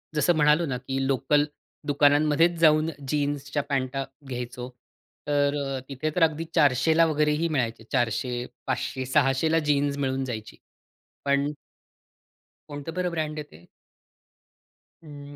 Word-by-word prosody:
जसं 165 +3 +3
म्हणालो 150 +2 +4
ना, 130 -5 -2
की 135 +1 -3
लोकल 145 +3 +2 0.4
दुकानांमध्येच 150 +4 +3
जाऊन 155 -1 +4 0.2
जीन्सच्या 145 0 -1
पॅंट 135 -1 -1 0.3
घ्यायचो. 125 -1 -5 0.6
तर 145 -1 +2 0.4
तिथे 140 +3 -2
तर 180 - +3
अगदी 160 0 +2
400 145 0 +4
ला 165 - +6
वगैरेही 150 +1 +1
मिळायचे. 115 -6 -1
400, 120 0 0 0.2
500, 130 0 -2
600 135 +2 +2
ला 165 - +4
जीन्स 145 -1 +2
मिळून 135 -1 -1
जायची. 110 -4 -6 0.7
पण 140 +1 +2 1.2
कोणतं 145 +2 -6
बरं 180 0 0
ब्रँड 155 -2 -2
आहे 150 - -4
ते? 85 +2 -16 1.4
हं, 145 -2 -11
145 Hz, 125 wpm, -26 LUFS, 130-155 Hz, 1.4 s, ला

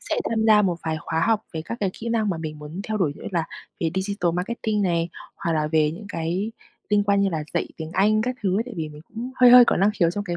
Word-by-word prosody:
sẽ - - -3 0.2
tham 220 -1 +1
gia 210 -1 +6
một 180 -3 +1
vài 160 -1 -1
khóa 160 +2 -2
học 220 -1 +2
về 160 -1 -4
các 230 - -5
cái 195 -2 +1
kỹ 230 - -6
năng 220 -2 +1
mà 170 - -2
mình 155 -2 -6
muốn 150 +5 -7
theo 215 - -1
đuổi, 165 -8 +1
như - - -13
là 170 -3 +1 0.4
về 165 -1 +1
digital 190 -2 -1
marketing 210 +3 -1
này, 170 -2 +1 0.3
hoặc 165 - -2
là 155 -1 +1
về 155 -1 +2
những 200 +6 -9
cái 180 +5 -2 0.4
liên 205 -1 +3
quan 200 -1 +3
như 200 - +3
là 160 -4 -3
dạy - - 0
tiếng 160 0 -6
Anh 215 +2 +3
các 250 +2 -2
thứ 190 -1 +1
ấy. - - +1
Tại 245 - -8
vì 160 -2 -3
mình 150 0 -12
cũng 235 +3 -6
hơi 250 -1 +7
hơi 245 0 +10
có - - +2
năng 200 +3 +3
khiếu 170 -5 +2
trong 205 +3 -4
cái 175 -2 -3
190 Hz, 285 wpm, -24 LUFS, 165-215 Hz, 0.4 s, hơi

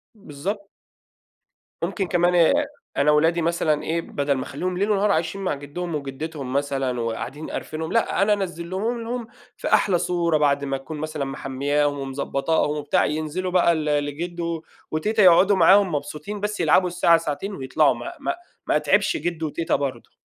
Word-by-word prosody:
بالضبط. 200 +3 -6 1.1
ممكن 195 -3 -1
كمان 175 -1 +4 0.4
أنا 145 +2 +4
ولادي 165 +3 +3
مثلًا 160 -2 +1
إيه، 170 +1 -1
بَدَل 145 -3 -1
ما 130 - -3
أخلّيهم 180 +8 -4
ليل 200 +3 +1
ونهار 205 0 +2
عايشين 165 +3 -1
مع 190 - 0
جِدِّهم 155 +4 -5
وجِدِّتهم 140 -1 -5
مثلًا 135 -3 -1
وقاعدين 120 +6 -4
قارفينهم، 160 +1 -4
لأ، 230 -3 +1
أنا 210 +1 +4
أنزّلهم 190 +4 -3
لهُم 235 0 -4 0.3
في - - -4
أحلى 190 -4 +4
صورة 170 -2 +1
بعد 140 -1 +2
ما 135 -1 -1
تكون 150 +4 -8
مثلًا 155 -1 -3
مَحميّاهم 140 +2 -1
ومضبّطاهم 140 +3 -1
وبتاع، 145 0 +1
ينزلوا 155 +5 -2
بقى 175 -2 +4
ل 155 -1 -2 0.2
لجِدو 170 +2 -4 0.3
وتيتة 210 +7 +1
يقعدوا 185 +3 +6
معاهم 190 0 +5
مبسوطين، 150 +8 -5
بس 210 +1 -3
يلعبوا 175 +2 +4
الساعة، 175 -1 +4
ساعتين 165 +5 -4
ويطلعوا 140 +3 +2
ما 345 - -7
ما 345 +5 -2 0.3
ما - - +3
نتعِبش 340 - +2
جِدو 165 - -2
وتيتة 165 +2 -1
برضه. 140 -2 -3
160 Hz, 155 wpm, -23 LUFS, 145-185 Hz, 1.1 s, يقعدوا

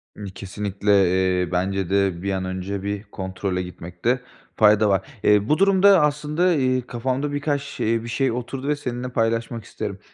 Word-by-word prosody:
Imm, 105 - -8
kesinlikle, 100 +1 -3 0.5
eee, 90 -1 -3
bence 95 0 -1
de 95 -3 +1
bir 100 +1 -2
an 95 -1 -2
önce 95 +1 -4
bir 100 0 -3
kontrole 95 -2 -4
gitmekte 90 +7 -3 0.3
fayda 105 0 +5
var. 95 +2 +1 0.2
Eee, 105 +1 +3
bu 150 - +4
durumda 195 -1 +5
aslında, 150 +4 +1
eee, 130 -4 +1
kafamda 130 +4 -2
birkaç 145 0 -1
şey 115 -5 -2
bir - - -7
şey 130 +2 0
oturdu 130 +3 -5
ve 150 - +2
seninle 125 -3 -4
paylaşmak 115 -1 -1
isterim. 105 -3 -6
115 Hz, 165 wpm, -23 LUFS, 100-135 Hz, 0.5 s, fayda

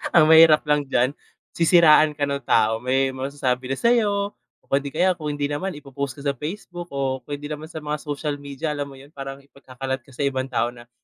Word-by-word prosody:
ang 155 - +8
mahirap 160 -1 +7
lang 150 0 +2
diyan, 130 +2 +2 0.4
sisiraan 155 -3 +5
ka 145 - +1
ng 140 0 -3
tao 110 -2 +2
may 130 +1 +1
masasabi 130 -1 -2
na 135 - -1
sa'yo 205 -4 +2 0.3
o - - -9
hindi 140 0 +1
kaya 180 +5 +2
kung 155 -3 -5
hindi 145 -1 -2
naman 145 +4 -3
ipo-post 140 -2 -6
ka 140 - -10
sa 140 - +1
Facebook 175 +4 -7
o 135 -2 -2
kung 145 +3 -6
hindi 145 - -10
naman 155 +1 -6
sa 160 - -8
mga 150 0 -4
social 145 -1 -4
media, 145 +2 -4
alam 145 -1 -4
mo 135 - -12
'yon 140 +3 -16
parang 135 0 -7
ipagkakalat 130 -1 -6
ka 130 - -23
sa 135 +2 -3
ibang 130 -1 -1
tao 120 0 0
na, 120 -1 -15
145 Hz, 220 wpm, -23 LUFS, 135-155 Hz, 0.4 s, ang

